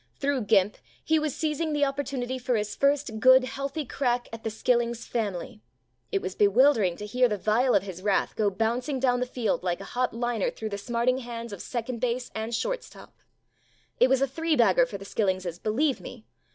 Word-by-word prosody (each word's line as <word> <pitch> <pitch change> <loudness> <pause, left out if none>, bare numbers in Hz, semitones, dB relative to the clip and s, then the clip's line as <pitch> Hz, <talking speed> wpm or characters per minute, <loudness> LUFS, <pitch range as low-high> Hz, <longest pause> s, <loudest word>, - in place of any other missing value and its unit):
Thru 280 -2 0
"Gimp" 205 -2 +3 0.3
he 315 0 +2
was 305 -3 -2
seizing 310 0 -1
the 290 -1 +3
opportunity 275 -2 -3
for 250 0 0
his 210 -1 -2
first 280 -5 +1
good 260 +2 +7
healthy 275 +3 -4
crack 245 -1 -1
at 225 - -8
the 225 - -1
"Skillings" 235 +1 0
family. 215 0 -3 0.5
It 395 - 0
was 185 - -3
bewildering 210 -2 +4
to 210 - -6
hear 250 +4 +2
the 210 - -1
vial 230 +6 +2
of 195 - +3
his 185 -2 -8
wrath 200 0 +1
go 210 -2 +2
bouncing 235 +7 -1
down 250 -1 +2
the 250 - -1
field 240 -5 -1
like 175 -1 -1
a - - -7
hot 250 0 +1
liner 240 -3 0
thru 220 - -6
the 200 - -4
smarting 240 +3 0
hands 235 -3 -7
of 200 - -7
second 240 0 -4
base 245 0 -1
and 220 +1 -3
short - - -2
stop. - - -14 0.9
It 250 - +5
was 265 0 +3
a - - +2
three 325 +4 0
bagger 235 0 +4
for 205 - -6
the 195 - -11
"Skil 205 +1 -1
lingses," 185 -2 -2
believe 260 +6 0
me. 235 -3 -10
240 Hz, 205 wpm, -27 LUFS, 215-265 Hz, 0.9 s, good